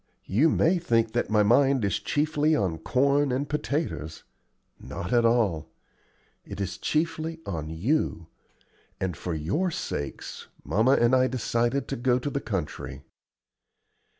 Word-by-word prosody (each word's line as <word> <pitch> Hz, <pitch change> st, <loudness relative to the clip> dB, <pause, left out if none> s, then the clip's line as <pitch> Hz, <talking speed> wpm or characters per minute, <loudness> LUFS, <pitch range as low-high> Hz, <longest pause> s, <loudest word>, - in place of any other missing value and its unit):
You 130 Hz, +12 st, +3 dB
may 175 Hz, +4 st, +3 dB
think 115 Hz, -8 st, +1 dB
that 120 Hz, -, -1 dB
my 105 Hz, -1 st, +4 dB
mind 130 Hz, +2 st, +4 dB
is 100 Hz, -, 0 dB
chiefly 150 Hz, +1 st, +1 dB
on 90 Hz, -, -1 dB
corn 140 Hz, -, +2 dB
and 135 Hz, +3 st, -1 dB
potatoes. 145 Hz, -, -3 dB, 0.6 s
Not 90 Hz, -, -5 dB
at 120 Hz, -1 st, +4 dB
all. 100 Hz, -10 st, +2 dB, 0.7 s
It -, -, -9 dB
is 95 Hz, -2 st, -3 dB
chiefly 160 Hz, +1 st, -1 dB
on 80 Hz, -5 st, -4 dB
you; 85 Hz, -, -1 dB, 0.7 s
and 95 Hz, -3 st, -2 dB
for 85 Hz, +2 st, -4 dB
your 100 Hz, -, 0 dB
sakes 70 Hz, -, -5 dB, 0.2 s
mamma 115 Hz, +6 st, +3 dB
and 120 Hz, -1 st, +4 dB
I 130 Hz, 0 st, +4 dB
decided 120 Hz, +1 st, 0 dB
to 135 Hz, -, -2 dB
go 125 Hz, +1 st, +2 dB
to 135 Hz, +3 st, -3 dB
the 140 Hz, -, -2 dB
country." 95 Hz, -8 st, -4 dB
120 Hz, 140 wpm, -26 LUFS, 95-145 Hz, 0.7 s, my